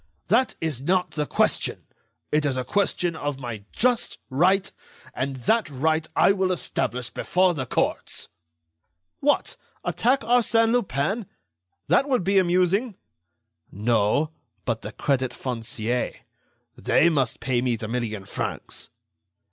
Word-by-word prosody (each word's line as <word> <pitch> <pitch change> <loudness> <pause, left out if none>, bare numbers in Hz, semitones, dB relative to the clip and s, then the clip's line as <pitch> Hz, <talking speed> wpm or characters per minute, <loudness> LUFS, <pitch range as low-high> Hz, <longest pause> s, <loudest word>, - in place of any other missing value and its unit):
"That 240 +6 +3
is 155 -6 -2
not 180 +5 +1
the 150 -1 -2
question. - - +1 0.5
It 150 0 +2
is 140 -3 0
a 130 - -1
question 180 +1 0
of 145 -3 -3
my 115 -6 -6
just 245 0 +1
right, 185 +7 +3 0.4
and 135 +1 -2
that 225 -6 +2
right 155 +3 0
I - - +5
will 190 -2 +1
establish 125 -7 -2
before 185 0 +2
the 130 -6 -4
courts." - - -2 0.9
"What! 290 +1 +1 0.3
attack 260 +3 +2
Arsène 230 -1 +3
Lupin? 200 - 0 0.6
That 275 - +3
would 255 -8 +2
be 195 +2 +4
amusing." 185 +5 +2 0.8
"No; 115 - +1 0.3
but - - -1
the - - -6
Crédit 130 -3 0
Foncier. 120 -1 -2 0.6
They 170 - +3
must 135 -7 0
pay 125 -2 0
me 125 -2 +1
the 110 -1 -6
million 110 -4 -3
francs." - - -5
155 Hz, 130 wpm, -25 LUFS, 125-195 Hz, 0.9 s, I